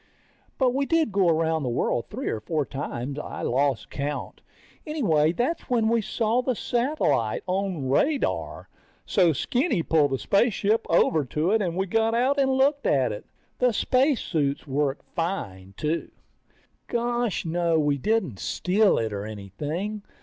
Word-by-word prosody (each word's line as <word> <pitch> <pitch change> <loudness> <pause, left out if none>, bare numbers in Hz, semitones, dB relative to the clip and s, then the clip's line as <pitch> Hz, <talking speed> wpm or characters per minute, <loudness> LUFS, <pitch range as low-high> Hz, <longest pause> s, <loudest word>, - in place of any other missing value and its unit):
But 255 -2 +2
we 275 +1 0
did 330 -7 +2
go 190 -3 +3
around 160 0 +1
the 130 - -2
world 120 0 -1
three 255 +6 -5
or 110 - -1
four 150 +7 -1
times. 135 0 -5
I - - -6
lost 135 -1 0
count. 145 0 -4 0.4
Anyway 165 - +2
that's 255 - -2
when 230 -3 +2
we 230 0 +2
saw 225 +3 0
the 255 -1 -1
satellite 235 - 0
on 185 -6 -2
radar. 275 - 0 0.4
So 180 -4 +3
Skinny 240 - 0
pulled 155 -3 +3
the 135 - -1
spaceship 215 - +1
over 165 -2 +3
to 155 +8 0
it 220 0 +3
and 175 -4 -1
we 190 - +1
got 225 +4 +1
out 265 +4 +2
and 265 -1 +3
looked 275 +2 +2
at 130 -5 +2
it. 105 - -7 0.3
The 250 -2 +3
spacesuits 210 - +1
worked 140 -1 -1
fine, 100 - -4
too. 155 +2 -2 0.8
Gosh 240 -3 -1
no, 170 0 +1
we 145 -2 +1
didn't 185 - 0
steal 200 +3 +2
it 110 -2 -1
or 100 +1 -4
anything. 145 - -5
175 Hz, 155 wpm, -25 LUFS, 145-235 Hz, 0.8 s, go